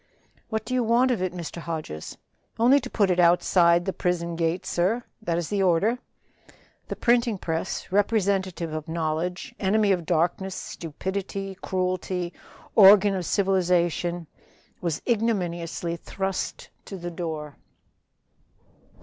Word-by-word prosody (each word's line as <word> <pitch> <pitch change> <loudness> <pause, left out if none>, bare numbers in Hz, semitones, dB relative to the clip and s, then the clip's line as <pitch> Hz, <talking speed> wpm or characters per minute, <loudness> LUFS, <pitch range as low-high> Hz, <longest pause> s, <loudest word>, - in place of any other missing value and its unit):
"What 220 -1 -2
do 255 - -4
you 250 -1 +2
want 240 +3 +3
of 230 -7 0
it, 185 -1 0
Mr. 175 -2 -7
Hodges?" 155 - -6 0.4
"Only 250 +5 +5
to 255 - -7
put 200 -6 +2
it 180 - +1
outside 175 0 +4
the 190 - -1
prison 170 -1 -1
gate, 165 +2 -1
sir. 200 +8 0 0.2
That 170 -6 -1
is 170 -2 -3
the 205 -1 0
order." 195 +7 +2 0.9
The - - -4
printing 235 -2 +2
press, 165 +2 -3
representative 195 -5 +1
of 155 -1 -5
knowledge, 165 +7 -2
enemy 205 +1 +2
of 175 -4 0
darkness, 180 +3 0
stupidity, 190 +4 -5
cruelty; 185 -1 -2 0.4
organ 200 0 +8
of 185 -3 -3
civilization 175 -3 +1 0.6
was 170 -4 -2
ignominiously 175 -7 -1
thrust 195 +2 -4
to 195 - -7
the 175 -1 -6
door. 160 -4 -5
180 Hz, 130 wpm, -25 LUFS, 170-200 Hz, 0.9 s, organ